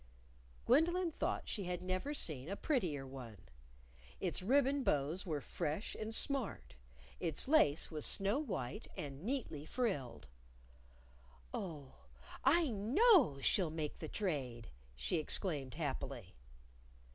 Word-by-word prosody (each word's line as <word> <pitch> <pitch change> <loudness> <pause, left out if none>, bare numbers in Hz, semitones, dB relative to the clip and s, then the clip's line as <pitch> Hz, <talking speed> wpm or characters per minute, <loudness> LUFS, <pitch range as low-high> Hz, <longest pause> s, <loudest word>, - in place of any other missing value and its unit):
Gwendolyn 345 +2 +3
thought - - -2
she 200 -4 -2
had 180 0 -3
never 185 +11 -2
seen 150 - -2
a 200 - -2
prettier 180 - -1
one. 130 -5 -9 0.8
Its - - -1
ribbon 275 +6 +3
bows 155 - 0
were 150 -4 -1
fresh 165 +7 -3
and 220 0 -5
smart; 235 - -1 0.5
its 165 - -1
lace 170 - +4
was 155 -2 -3
snow 200 +7 +5
white 160 - -4
and 140 -1 -6
neatly 220 - -3
frilled. 155 - -2 1.3
"Oh, 150 -8 -5 0.5
I 335 -3 +4
know 240 - +4
she'll 180 +4 +3
make 155 -1 -4
the 155 - -5
trade!" 130 - -3 0.3
she 65 - -1
exclaimed 150 -4 0
happily. 135 - -4
170 Hz, 120 wpm, -37 LUFS, -, 1.3 s, snow